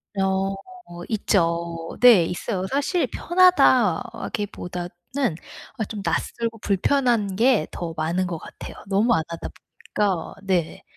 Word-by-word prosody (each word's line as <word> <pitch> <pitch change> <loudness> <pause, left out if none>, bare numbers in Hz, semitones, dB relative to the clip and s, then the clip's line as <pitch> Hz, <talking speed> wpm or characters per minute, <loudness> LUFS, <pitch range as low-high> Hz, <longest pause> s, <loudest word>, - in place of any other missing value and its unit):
어. 195 0 0 0.6
있죠. 170 -5 -1
네. 235 -9 +7
있어요. 185 +2 -3
사실 290 - 0
편하다기보다는 245 - +1 0.9
어 220 - -1
좀 210 -2 -5
낯설고 230 +1 -2
불편한 210 -1 +1
게 230 -7 +3
더 170 -2 -5
많은 170 +4 0
것 175 -2 -4
같아요. - - -10
너무 205 +5 +2
안 160 - +2
하다 165 0 -6
보니까. 190 -6 -3
네네. 180 -4 -1
195 Hz, 230 characters per minute, -23 LUFS, 175-235 Hz, 0.9 s, 네